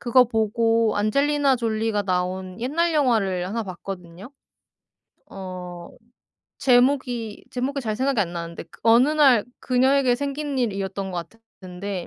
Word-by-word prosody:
그거 250 +1 +5
보고 225 0 +1
안젤리나 280 +5 +2
졸리가 220 -2 -1
나온 185 0 -2
옛날 325 +7 0
영화를 210 -11 +1
1 225 +4 -3
봤거든요. 185 +2 -8 1.0
어 180 -2 -8 0.7
제목이, 245 -3 +1
제목이 270 +2 -2
잘 215 -3 -3
생각이 265 -3 +1
안 175 -4 -1
나는데 170 -1 -6
그 - - -17
'어느 235 +5 +6
날 280 -8 +4 0.2
그녀에게 260 0 +3
생긴 285 +2 -3
일'이였던 195 -5 -2
것 170 -2 -5 0.3
같은데 185 0 -6
225 Hz, 275 characters per minute, -23 LUFS, 190-260 Hz, 1.0 s, 어느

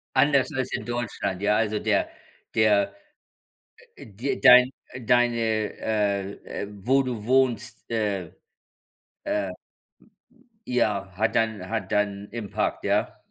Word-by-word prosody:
Anders 140 -1 +4
als 130 -1 -2
in - - -3
Deutschland. 115 -6 -3
Ja, 105 +1 +3
also, 105 -1 0
der - - +1 0.5
der 100 -2 +3 1.0
äh, - - -12
dir 110 +7 -4
dein 125 -1 +8 0.2
äh, 130 - -8
deine 120 0 +3
äh, 105 -2 -1 0.3
äh, 100 - -5
wo 125 +7 +1
du 120 -5 -4
wohnst, 130 -3 +1
äh, 100 -6 -1 0.9
äh, 100 -2 -1 1.2
ja, 100 -6 0
hat 110 +2 0
dann 110 -4 0
hat 110 -4 -3
dann 100 -1 -1
impact, 115 -4 -3
ja. - - 0
110 Hz, 120 wpm, -25 LUFS, 100-120 Hz, 1.2 s, dein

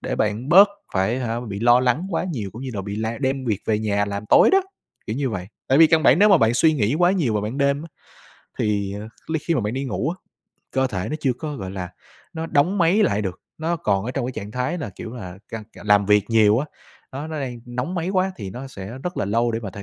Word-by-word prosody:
để - - -3
bạn 110 +5 -1
bớt 195 +4 +8 0.2
phải, 105 +6 +1
hả, 120 -2 -2
bị 105 -4 -6
lo 120 +1 +5
lắng 130 +9 +1
quá - - -1
nhiều 105 -9 -4
cũng 120 +4 -8
như 130 - -4
là 100 - -2
bị 100 +1 -5
la 110 +1 -3
đem 135 -1 -1
việc 110 -5 0
về 105 -1 +2
nhà 100 -2 0
làm 100 +1 -5
tối - - +6
đó, 390 - +6 0.5
kiểu 110 - -3
như 135 -3 -1
vậy. 90 -4 -4 0.2
Tại 135 +3 +4
vì 165 - +9
căn 160 0 +3
bản 140 +3 +5
nếu 210 +1 +6
mà 195 - +7
bạn 115 -2 +3
suy 155 +6 +4
nghĩ 120 -3 +1
quá 175 0 +5
nhiều 150 - +1
vào 105 - 0
ban 115 +7 -4
đêm 140 +1 +1
á, 165 - -9 0.7
thì 100 -2 0 0.3
li 160 0 -1
khi 170 - +2
mà 120 - +1
bạn 105 +3 -2
đi 135 +1 -2
ngủ 135 +3 -2
á, 175 - -4 0.6
cơ 130 0 +1
thể 95 -6 -3
nó 155 - -2
chưa 130 -3 +2
có, 145 +3 -6
gọi 95 -2 -6
là, 90 -2 -5 0.4
nó 160 0 -4
đóng 175 +8 +2
máy 180 +5 +4
lại 105 - +1
được, 95 -3 -4 0.2
nó 165 +2 -1
còn 100 -11 0
ở 125 - -3
trong 135 -2 -2
cái 130 - -4
trạng 105 -2 -6
thái 125 +9 -2
là, 145 - -5
kiểu 110 +4 -8
là, 95 -6 -8
căng 110 -1 -6
c - - -33 0.2
làm 100 -1 +4
việc 105 -1 +4
nhiều 110 0 +5
á, 145 - -2 0.5
nó 140 +3 -5
nó 160 -2 -5
đang 125 -3 -5
nóng 125 +8 -4
máy 170 +1 -2
quá 190 0 +1
thì 100 -4 -6
nó 125 +6 -7
sẽ 115 0 -8
rất 180 +2 -4
là - - 0
lâu 115 +4 +1
để 115 - -2
mà 100 -4 -6
thể 100 +2 -9
120 Hz, 275 wpm, -22 LUFS, 105-150 Hz, 0.7 s, vì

